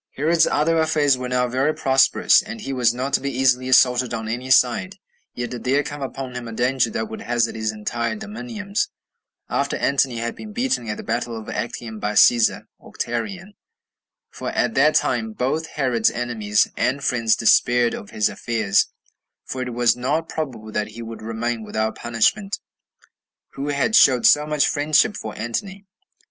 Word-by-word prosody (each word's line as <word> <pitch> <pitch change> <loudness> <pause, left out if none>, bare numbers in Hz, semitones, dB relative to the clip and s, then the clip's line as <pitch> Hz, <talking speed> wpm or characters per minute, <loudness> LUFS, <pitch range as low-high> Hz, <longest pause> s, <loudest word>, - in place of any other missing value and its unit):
1. 145 - -3
Herod's 165 +1 +4
other 165 +2 +2
affairs 150 -3 +3
were 125 0 -5
now 125 0 +1
very 135 +5 0
prosperous, 135 0 +4
and 220 +1 -8
he 135 - -4
was 125 -3 +3
not 130 +3 -4
to - - +2
be 140 - -2
easily 130 0 +1
assaulted 125 -1 +4
on 110 -1 -5
any 125 +3 -4
side. 130 +10 +3 0.4
Yet 120 0 -4
did 120 -2 -6
there 140 +3 +2
come 145 0 -7
upon 135 -1 -5
him 120 -1 -6
a 115 - -7
danger 125 +1 +1
that 110 0 -3
would 110 - -8
hazard 120 +1 0
his 110 -1 -2
entire 115 - -3
dominions, 215 - -4 0.6
after - - -1
Antony 135 -3 +1
had 115 +1 -3
been 215 -1 -10
beaten 245 - -1
at 105 - -3
the - - -7
battle 120 -1 -3
of 110 - -11
Actium 115 -2 -5
by 105 0 -2
Cæsar 115 +2 +4 0.2
[Octavian]; 180 - -5 0.8
for - - -5
at - - 0
that - - +3
time 220 0 0
both 160 -1 -1
Herod's 125 -7 +1
enemies 110 -4 0
and 140 +2 -1
friends 115 -4 +2
despaired 120 +1 +3
of 100 - -7
his 105 - +1
affairs, 110 -4 0 0.6
for 130 - -5
it 125 -1 -4
was 120 -1 +3
not 145 +7 -1
probable 120 -9 -5
that 105 0 -2
he 115 +2 -9
would 115 0 -8
remain 115 +1 -3
without 110 0 -2
punishment, 120 - 0 1.0
who 140 +1 -5
had 145 +9 +1
showed 130 - +5
so 150 0 +5
much 150 -1 +2
friendship 155 +8 +2
for 110 - -7
Antony. 190 - -4
125 Hz, 180 wpm, -22 LUFS, 115-150 Hz, 1.0 s, showed